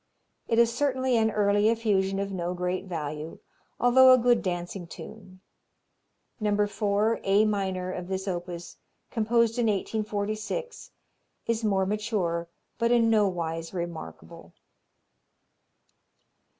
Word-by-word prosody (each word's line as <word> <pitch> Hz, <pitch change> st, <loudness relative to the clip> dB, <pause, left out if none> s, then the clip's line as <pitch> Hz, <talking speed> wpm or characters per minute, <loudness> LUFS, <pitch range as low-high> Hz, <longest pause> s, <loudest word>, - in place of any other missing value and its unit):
It 230 Hz, -, +1 dB
is 235 Hz, 0 st, +4 dB
certainly 260 Hz, -1 st, +1 dB
an 220 Hz, -1 st, +3 dB
early 205 Hz, 0 st, +2 dB
effusion 200 Hz, -4 st, +1 dB
of 200 Hz, 0 st, -2 dB
no 180 Hz, -1 st, -3 dB
great 180 Hz, +1 st, -2 dB
value, 155 Hz, -3 st, -5 dB, 0.4 s
although 260 Hz, +1 st, +7 dB
a 255 Hz, -, +8 dB
good 240 Hz, -1 st, +3 dB
dancing 175 Hz, -1 st, -4 dB
tune. 185 Hz, -1 st, -11 dB, 1.0 s
No. 210 Hz, -1 st, +2 dB
4 210 Hz, +1 st, 0 dB
A 200 Hz, +2 st, +4 dB
minor, 190 Hz, -3 st, -1 dB
of 180 Hz, -1 st, -6 dB
this 190 Hz, +1 st, -3 dB
opus, 175 Hz, -1 st, -5 dB, 0.3 s
composed 230 Hz, +1 st, +1 dB
in 235 Hz, -, +2 dB
1846, 215 Hz, -, -3 dB, 0.6 s
is 230 Hz, -1 st, -1 dB
more 195 Hz, -3 st, +2 dB
mature, 195 Hz, -5 st, -2 dB, 0.3 s
but 235 Hz, 0 st, +2 dB
in 230 Hz, -2 st, +4 dB
no 210 Hz, -2 st, +4 dB
wise 165 Hz, -1 st, -4 dB
remarkable. 165 Hz, -, -7 dB
205 Hz, 120 wpm, -27 LUFS, 180-225 Hz, 1.0 s, a